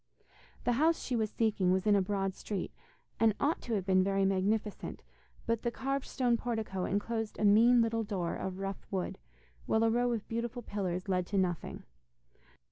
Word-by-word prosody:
The 245 - +2
house 330 +1 +4
she 255 - -1
was 220 -2 +1
seeking 205 -5 +1
was 190 0 +1
in 210 -1 +5
a 200 - +4
broad 195 0 -1
street, 195 0 -4 0.5
and 225 -2 +4
ought 305 +4 +1
to 230 - -2
have 195 -3 -2
been 185 -1 +4
very 195 0 +2
magnificent, 200 +2 -1 0.4
but 230 -1 0
the 235 - 0
carved 275 +3 -2
stone 245 -2 +1
portico 220 -6 -2
enclosed 225 +2 -2
a 215 - +1
mean 230 +4 +6
little 225 0 0
door 185 -5 -2
of 190 -1 -4
rough 195 0 -5
wood, 190 -2 -3 0.5
while 220 0 +3
a 225 - +4
row 245 +1 +2
of 225 -3 -3
beautiful 235 +1 -3
pillars 185 -4 -3
led 180 -2 0
to 200 - -1
nothing. 180 -3 -1
210 Hz, 185 wpm, -32 LUFS, 190-230 Hz, 0.5 s, mean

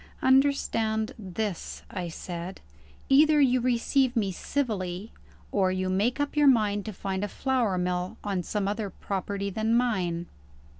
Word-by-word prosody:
"Understand 260 -4 +2
this," 195 -1 -4
I 180 -3 -3
said: 175 +2 -6 0.5
"either 300 +2 +6
you 255 -3 +4
receive 255 +1 +2
me 205 -4 +1
civilly 200 -4 -3 0.4
or 190 -2 +2
you 185 0 -1
make 210 +8 +1
up 290 +1 -1
your 295 -1 +5
mind 210 -6 +3
to 220 - -4
find 195 0 -3
a - - 0
flour 240 -4 0
mill 180 0 -2
on 195 -3 -1
some 200 +3 -2
other 210 0 -2
property 200 +1 -3
than 220 +3 +1
mine." 180 -9 0
205 Hz, 145 wpm, -27 LUFS, 185-250 Hz, 0.5 s, either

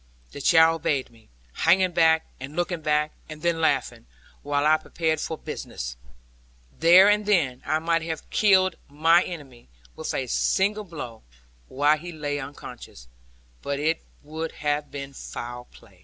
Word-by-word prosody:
The 140 - -8
child 165 +2 +5
obeyed 135 -4 -1
me, 115 -1 -22 0.2
hanging 185 0 +3
back, 160 -1 +3
and 135 +3 -8
looking 175 -1 -2
back, 150 0 +1 0.2
and 155 0 -9
then 170 -1 +1
laughing, 160 - 0 0.3
while 145 0 0
I 155 +1 +5
prepared 160 -1 -2
for 160 - -4
business. - - -6 0.8
There 175 +4 +8
and 210 0 +2
then 140 -11 +2
I 155 +2 +2
might 165 +1 0
have 160 -1 -5
killed 185 -3 +4
mine 165 +5 +4
enemy, 135 - -10 0.3
with - - -4
a - - -1
single 190 - +1
blow, 145 - -8 0.5
while 145 +3 +2
he 175 +3 -8
lay 145 -3 -3
unconscious; 135 - -10 0.5
but 140 0 -3
it 160 +3 0 0.2
would 160 +2 -5
have 150 0 -2
been 140 -1 -7
foul 120 -1 -7
play. 95 -6 -20
155 Hz, 155 wpm, -25 LUFS, 140-170 Hz, 0.8 s, There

